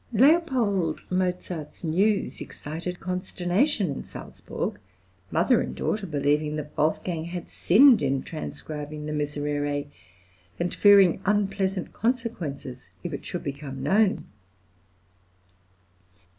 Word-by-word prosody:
L. 245 - +3 0.2
Mozart's 180 -4 -2
news 195 +6 +1
excited 170 +4 -6
consternation 185 - 0
in 135 - -5
Salzburg, 100 - -6 0.5
mother - - +3
and 65 0 -4
daughter 205 - -2
believing 150 0 +1
that 150 -1 -6
Wolfgang 160 +2 0
had 175 0 -6
sinned 240 - +6
in 135 -1 0
transcribing 150 -1 -6
the 150 - -3
Miserere, 145 -1 -1 0.7
and 175 0 -1
fearing 200 -4 +6
unpleasant 195 -2 0
consequences 180 - -3
if 175 -3 -4
it 140 - -5
should 175 - -4
become 140 -2 -5
known. 205 +7 +2
170 Hz, 105 wpm, -26 LUFS, 150-200 Hz, 0.7 s, sinned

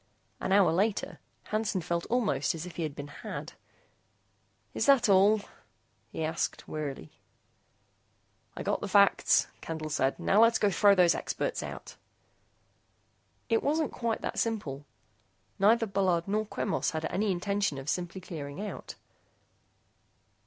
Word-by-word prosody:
An - - -3
hour 195 -4 +5
later, 200 +5 -1 0.2
Hansen 215 -3 -1
felt 170 0 -2
almost 205 - 0
as 165 +1 -6
if 180 -2 -10
he - - -2
had 155 -3 -3
been 145 - -7
had. - - -7 1.2
"Is - - -1
that 270 -4 +5
all?" 200 +2 +5 0.7
he 160 - -4
asked, 160 +1 -2
wearily. 140 - -5 1.5
"I - - -4
got - - -1
the - - -3
facts," - - +4 0.2
Candle 155 -1 -5
said. 135 -2 +1
"Now 205 - +3
let's 230 0 +5
go 205 - +2
throw 200 +2 +5
those 180 -2 +5
experts - - -3
out." - - -8 1.5
It 225 -2 +2
wasn't 310 +1 0
quite 230 -2 -2
that - - -3
simple. 150 -12 -3 0.7
Neither 225 +4 +4
Bullard 190 -4 0
nor 215 +2 -1
Quemos 190 -6 -1
had 160 0 -3
any 205 +1 0
intention 200 -3 -1
of 135 +1 -8
simply 175 +3 -3
clearing 150 -3 -7
out. 210 0 -6
190 Hz, 140 wpm, -29 LUFS, 160-215 Hz, 1.5 s, hour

